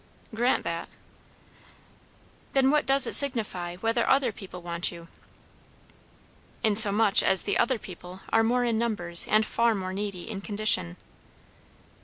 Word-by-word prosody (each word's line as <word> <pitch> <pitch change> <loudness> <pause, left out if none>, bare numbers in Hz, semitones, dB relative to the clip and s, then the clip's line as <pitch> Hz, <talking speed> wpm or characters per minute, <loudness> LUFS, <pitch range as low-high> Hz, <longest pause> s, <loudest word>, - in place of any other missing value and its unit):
"Grant 240 +3 -2
that." 170 0 -7 1.6
"Then 270 0 0
what 300 -2 -2
does 275 0 +5
it - - -5
signify, 210 -10 +3
whether 225 +5 -4
other 265 -3 0
people 195 -3 -13
want 170 0 -4
you?" 170 -1 -15 1.5
"Insomuch 210 0 +5
as 190 -1 +1
the - - -4
'other 250 +1 -1
people' 180 -1 -14
are 225 - 0
more 245 +2 -2
in 230 -2 -3
numbers 175 -7 +2
and 215 0 0
far 230 +1 -2
more 185 -1 -7
needy 200 -2 -8
in 205 -3 -9
condition." 205 - -1
215 Hz, 135 wpm, -24 LUFS, 180-235 Hz, 1.6 s, does